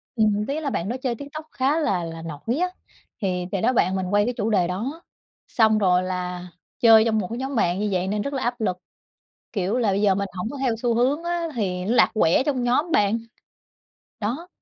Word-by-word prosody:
ừm, 210 -2 +2
ý 285 +3 -1
là 300 -3 -2
bạn 190 -5 -2
đó 245 - -2
chơi 250 -3 0
TikTok 285 +5 -8
khá 275 +5 +1
là 195 - 0
là 165 0 -6
nổi 165 - -4
á 360 +1 +1 0.5
thì 180 -2 -1
thì 195 - -1
đó, 250 +3 +2
bạn 190 -5 +2
mình 190 -1 -1
quay 205 0 +4
cái 245 - -1
chủ 215 - 0
đề 190 -5 +2
đó 240 - -4 0.5
xong 220 -2 +3
rồi 185 -3 +3
là 180 -1 -4 0.3
chơi 225 -2 +7
trong 220 -1 +1
1 190 - -2
cái 230 - -5
nhóm 265 +2 -4
bạn 180 -4 +1
như 210 0 0
vậy 185 0 0
nên 205 +1 -1
rất 280 +6 -4
là 270 - -2
áp 240 0 -2
lực, 185 -4 0 0.8
kiểu 200 +2 0
là, 230 -4 +2
bây 195 +1 0
giờ 200 -2 +4
mình 200 +1 -1
hổng 180 +4 -4
có 285 - -7
theo 250 -4 +1
xu 235 +1 0
hướng 270 +7 +1
á 345 -1 -1
thì 185 -5 -2
nó 225 +5 +1
lạc - - +5
quẻ 210 0 +3
trong 265 -3 -1
nhóm 275 +8 +1
bạn, 210 -1 +3 1.0
đó. 255 +12 -3
220 Hz, 235 wpm, -24 LUFS, 185-255 Hz, 1.0 s, chơi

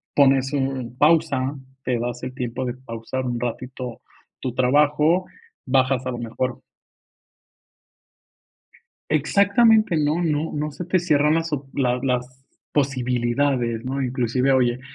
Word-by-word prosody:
pones 135 -1 +4
un 130 -3 -2
pausa, 145 -3 +2 0.3
te 125 -1 0
das 120 +1 -4
el 130 - -5
tiempo 125 0 -3
de 120 - -3
pausar 130 0 -5
un 120 -1 -2
ratito 125 0 -5 0.4
tu 125 -2 -4
trabajo, 150 +7 +3 0.4
bajas 130 -1 +2
a 130 - -2
lo 120 - -4
mejor 120 +2 -3 2.5
Exactamente. 200 - +4
No 155 +3 +1
no 155 -1 0
no 150 0 -2
se 175 +5 -7
te 185 +1 +2
cierran 150 -3 +3
las 165 0 -1
op 140 -2 -3
las 125 -2 +1
las 125 0 -2 0.3
posibilidades, 125 -2 0
¿no? 130 +2 -3
Inclusive, 125 +1 0
oye, 125 -1 +2
130 Hz, 130 wpm, -23 LUFS, 125-150 Hz, 2.5 s, pones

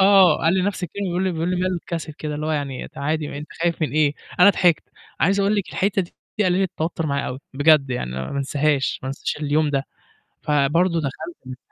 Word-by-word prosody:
آه 190 -4 +7
قال 165 +3 +2
لي 190 - +2
نفس 195 -1 -1
كلمة 200 +4 -5
بيقول 180 +1 -1
لي، 185 - 0
بيقول 165 +2 -1
لي 180 - 0
ما 180 +1 0
له 180 -2 -1
الcassette 160 -3 -5
كده 150 -1 -4
اللي 150 +1 -3
هو - - -1
يعني 140 -4 -3
ت - - -14
عادي 150 0 -2
أنت 150 - -9
خايف 170 -1 0
من 155 - +1
إيه؟ 150 -1 +2 0.3
أنا 190 +3 +9
ضحكت، 175 -5 +3 0.4
عايز 200 +1 +3
أقول 200 +1 +2
لِك 200 - -1
الحِتّة 195 0 +1 0.4
دي 210 - +3
قللِت 185 0 +2
توتر 165 0 -2
معايا 140 -1 -1
أوي، 125 - -4 0.2
بجد 145 -1 +4
يعني، 120 - -2
ما 65 +1 -4
انساهاش، 140 0 +1
ما 130 - -4
انساش 135 - -3
اليوم 150 0 +1
ده. 135 -1 0 0.6
فبرضه 160 +4 +2
دخلت 140 -2 -6
155 Hz, 220 wpm, -22 LUFS, 145-180 Hz, 0.6 s, أنا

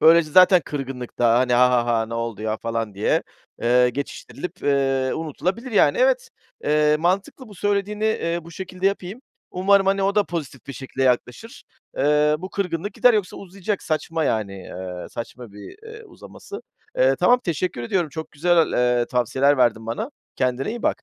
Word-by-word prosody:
Böylece 165 -1 +5
zaten 180 +1 +7
kırgınlık 135 -4 -6
da, 120 -1 +4
hani, 125 0 +1
"Ha, 125 +1 +5
ha, 120 -1 +2
ha! 115 -2 +1
Ne 115 - -6
oldu 115 -2 -4
ya?" 110 0 -1
falan 115 -3 -4
diye, 100 - +1 0.4
eee, 125 +1 +4
geçiştirilip, 145 +6 -7
eee, 135 -2 +1
unutulabilir, 185 - -3
yani. 345 - +4
Evet, - - +2 0.4
eee, 150 0 +3
mantıklı 195 - -1
bu 205 - -13
söylediğini, 205 +2 -1
eee, 170 -6 0
bu 170 - -12
şekilde 185 +2 -4
yapayım. 200 +3 -2 0.3
Umarım, 195 +1 +3
hani, 195 0 +2
o 195 +1 +1
da 210 -1 +3
pozitif 145 -8 -6
bir 140 - -6
şekilde 135 0 -5
yaklaşır. 125 - -1 0.3
Eee, 150 +2 +3
bu 185 +3 -7
kırgınlık 195 0 -3
gider 250 -2 +5
yoksa 205 -4 -1
uzayacak, 195 +1 -4
saçma 160 0 -2
yani, 110 -5 -1
eee, 90 -1 -7
saçma 115 -1 -8
bir, 105 - -11
eee, 450 0 -11
uzaması. 410 0 -11 0.4
Eee, - - +4
tamam 250 +1 +4
teşekkür 170 -6 -2
ediyorum, 170 +5 0
çok 160 +2 -7
güzel, 170 +2 +2
eee, 125 -1 +2
tavsiyeler 130 +4 +2
verdin 115 -2 +2
bana. 170 - -4 0.3
Kendine 125 +1 -1
iyi 235 0 -6
bak. - - 0
155 Hz, 175 wpm, -22 LUFS, 125-195 Hz, 0.4 s, zaten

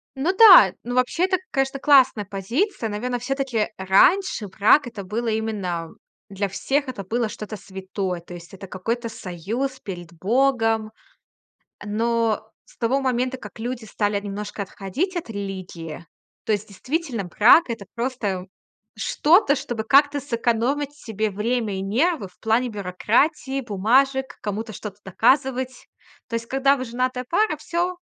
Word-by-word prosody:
Ну 295 +8 0
да, 375 - +9
ну, 245 +1 -4
вообще, 255 +8 +2
это, 375 0 +1
конечно, 270 0 0
классная 265 -7 +5
позиция. 230 - -2
Наверное, 245 +4 -3
всё-таки 255 -3 -1
раньше 210 - +3
брак- 220 +8 +4
это 220 -4 -7
было 220 +5 -3
именно 205 -7 -2 0.4
для 200 +1 -2
всех, 275 +9 -1
это 245 -6 -5
было 230 +4 -1
что-то 215 0 -7
святое. 190 -1 -5
То 175 - -12
есть 175 +1 -11
это 195 0 -9
какой-то 230 +6 -3
союз 225 +7 -4
перед 175 -4 -8
богом. 225 +2 +1 0.9
Но 225 0 0 0.2
с - - -22
того 255 +4 +1
момента, 255 0 0
как 210 -3 -11
люди 240 0 -4
стали 205 -1 -1
немножко 205 +1 -6
отходить 200 - -4
от 340 -8 -4
религии, 185 -5 -6 0.4
то - - 0
есть 210 0 -1
действительно, 255 - -3
брак- 215 - +6
это 230 -4 -5
просто 230 -7 -2 0.5
что-то, 305 -1 +3
чтобы 240 -5 -4
как-то 285 +5 +4
сэкономить 250 +3 -1
себе 220 -6 -3
время 215 +1 -1
и 190 - -3
нервы 235 - 0
в 180 - -25
плане 230 +3 +1
бюрократии, 235 - 0
бумажек, 260 +5 +2 0.2
кому-то 215 +2 -4
что-то 205 -1 -8
доказывать. 260 +5 +1 0.4
То - - -13
есть, 230 0 -4
когда 270 +2 +3
вы 255 - -4
женатая 255 +1 -2
пара, 385 -1 +2
всё 345 +4 -2
230 Hz, 145 wpm, -23 LUFS, 200-265 Hz, 0.9 s, да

